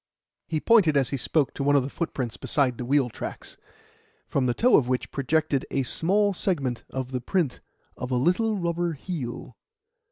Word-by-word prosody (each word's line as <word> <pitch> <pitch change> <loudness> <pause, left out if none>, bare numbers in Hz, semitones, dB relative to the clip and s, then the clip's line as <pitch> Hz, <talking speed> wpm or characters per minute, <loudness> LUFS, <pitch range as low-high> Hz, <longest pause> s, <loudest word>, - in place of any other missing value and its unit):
He 155 - -1
pointed 175 -7 +4
as 135 -3 +2
he 140 - -1
spoke 145 +2 +1
to 140 - -3
one 145 +1 +3
of 140 - +4
the 135 - -4
footprints 130 -8 -3
beside 130 -5 0
the 125 - -3
wheel 135 0 +3
tracks, 120 - -7 0.7
from 130 -2 0
the 120 - 0
toe 250 +1 +4
of 125 - +4
which 125 0 -1
projected 145 0 0
a 135 - 0
small 200 +9 +1
segment 140 - -1
of 130 -1 -4
the 125 -1 -2
print 155 -1 -1 0.4
of 125 - -5
a 130 - 0
little 180 - +2
rubber 170 -1 -1
heel. 145 -5 -6
140 Hz, 185 wpm, -26 LUFS, 130-170 Hz, 0.7 s, pointed